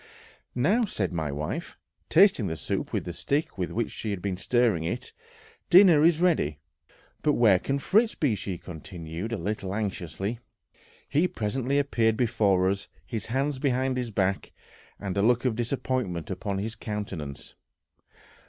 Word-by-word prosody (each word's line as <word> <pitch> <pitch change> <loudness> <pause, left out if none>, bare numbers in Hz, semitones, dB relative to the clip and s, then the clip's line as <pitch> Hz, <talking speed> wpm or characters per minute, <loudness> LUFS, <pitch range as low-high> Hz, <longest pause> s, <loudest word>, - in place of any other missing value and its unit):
"Now," 190 - +3
said 95 - -2
my 80 -4 -2
wife, 75 +2 -4 0.3
tasting 185 - +5
the 80 -2 -3
soup 75 - -3
with - - -2
the 85 - -4
stick 145 - -1
with 90 - -1
which 115 0 -1
she 110 - -5
had 100 -3 -2
been 95 0 -2
stirring 105 -1 +1
it, 120 +10 -4 0.6
"dinner 175 -5 +7
is 165 0 +4
ready, 155 - +2 0.6
but 150 - +3
where 105 -8 +5
can 135 +7 -1
Fritz 215 +10 +2
be?" 140 -7 +1
she 100 -3 -4
continued, 85 +3 -7
a 115 - -1
little 95 +1 -3
anxiously.... 100 +1 -3 0.7
He 160 +5 +2
presently 130 - -1
appeared 115 -6 +2
before 100 -6 +2
us, 100 +1 -1 0.2
his 110 -4 -4
hands 135 +3 -1
behind 130 -1 +1
his 125 -2 -2
back, 100 -2 -1 0.5
and 95 -2 -4
a - - +3
look 120 +4 +3
of 125 -4 +1
disappointment 120 - -2
upon 100 +1 -3
his 110 +3 -3
countenance. 100 - -6
110 Hz, 155 wpm, -27 LUFS, 95-130 Hz, 0.7 s, dinner